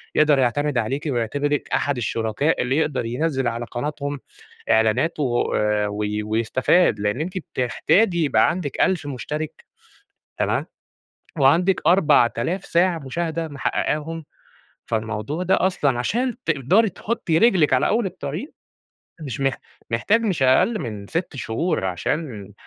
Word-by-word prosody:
يقدر 150 -2 +4
يعتمد 140 +3 +1
عليكِ 130 +6 -1
ويعتبرِك 145 +5 -1
أحد 145 -2 0
الشركاء 115 +5 0
اللي 130 +3 0
يقدر 145 -6 0
ينزِّل 135 +2 -1
على 120 0 -2
قناتهم 145 +3 -4 0.5
إعلانات 110 +9 +2
و 120 -4 0
آآ 105 -1 +1
وي 105 +1 -2
ويستفاد، 115 - +2
لإن 105 +5 -1
أنتِ 180 +4 -3
بتحتاجي 170 - +1
يبقى 110 -6 +3
عندِك 160 -5 -4
1000 175 -6 +2
مُشترِك 150 +3 -5 0.7
تمام؟ - - 0 0.7
وعندِك 170 +8 +4
4000 170 -1 +3
ساعة 170 -1 +2
مشاهدة 165 +3 -3
محقّقاهم. 155 +2 -2 0.6
فالموضوع 110 - -3
ده 190 +1 +3
أصلًا 140 -9 0
عشان 240 - -1
تقدري 165 - +3
تحُطّي 180 -3 -1
رجلِك 180 - +4
على 130 - +3
أول 225 -1 +1
الطريق، 180 - -5 0.7
مش 135 -6 -5
مح 135 -2 +1 0.3
محتاج 200 - +2
مش 185 -11 0
أقل 195 - +3
من 105 -3 -6
6 165 - -3
شهور 115 - -1
عشان 105 - -3
145 Hz, 125 wpm, -22 LUFS, 120-170 Hz, 0.7 s, يقدر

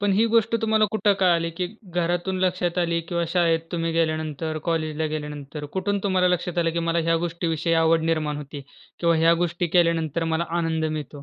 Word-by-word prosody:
पण 205 -1 +2
ही 215 +4 +3
गोष्ट 230 0 +3
तुम्हाला 220 -1 +3
कुठं 215 -2 +2
कळाली? 170 -3 +3
की 180 +2 -3 0.3
घरातून 175 +2 -1
लक्षात 180 -1 0
आली 170 -1 +1
किंवा 170 -1 0
शाळेत 170 -2 +2
तुम्ही 165 -1 -1
गेल्यानंतर, 155 -1 -1
कॉलेजला 160 -2 -1
गेल्यानंतर 150 -1 -6
कुठून 200 +2 0
तुम्हाला 185 -2 +2
लक्षात 180 0 -1
आलं? 165 -1 +2
की 170 - -2
मला 165 0 0
ह्या 165 0 +2
गोष्टीविषयी 165 -1 -2
आवड 165 0 +3
निर्माण 155 -2 -1
होती 145 0 -7 0.4
किंवा 170 -1 +3
ह्या 165 +1 +5
गोष्टी 175 +1 -2
केल्यानंतर 165 -2 +1
मला 170 - 0
आनंद 160 -1 -1
मिळतो? 150 -2 -4
165 Hz, 180 wpm, -24 LUFS, 160-180 Hz, 0.4 s, ह्या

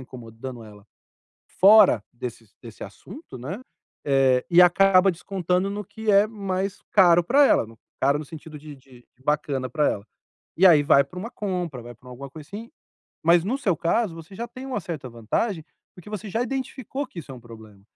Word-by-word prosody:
incomodando 120 -1 -10
ela, 105 -1 -15 0.8
fora 195 - +7
desse 120 -2 -8 0.2
desse 115 -3 -10
assunto, 130 - -11
né. 150 - -7 0.4
Eh, 135 -2 +3
e 175 +1 +6
acaba 185 +1 +5
descontando 180 +1 -2
no 205 +1 -5
que 220 +1 -3
é 200 +2 +5
mais 195 -2 -4
caro 175 -3 +5
pra 280 - +4
ela, - - +3 0.4
caro 140 +2 +2
no 155 - -7
sentido 155 0 -11
de 150 -1 -11
de 130 -2 -20 0.2
bacana 140 -3 -1
para 150 +4 +1
ela. 100 +1 -5 0.5
E 190 - +6
aí. 160 -5 +6
vai 140 0 +5
pra 180 +4 -10
uma 230 - -6
compra, 180 - -4
vai 120 - -10
pra 125 +3 -17
alguma 135 +2 -9
coisa, 150 0 -12
assim 220 +4 -9 0.5
Mas 170 +1 +5
no 240 +7 -1
seu 195 -11 +1
caso, 175 +3 0
você 165 +3 -12
já 235 +5 -5
tem 255 +3 -10
uma 250 -6 -3
certa 155 -7 -7
vantagem 150 - -3 0.3
porque 180 +3 -13
você 210 0 -6
já 225 +4 -1
identificou 265 +1 -5
que 185 - -13
isso 140 -3 -11
é - - -8
um 125 - -12
problema. 110 -4 -14
170 Hz, 185 wpm, -24 LUFS, 130-200 Hz, 0.8 s, fora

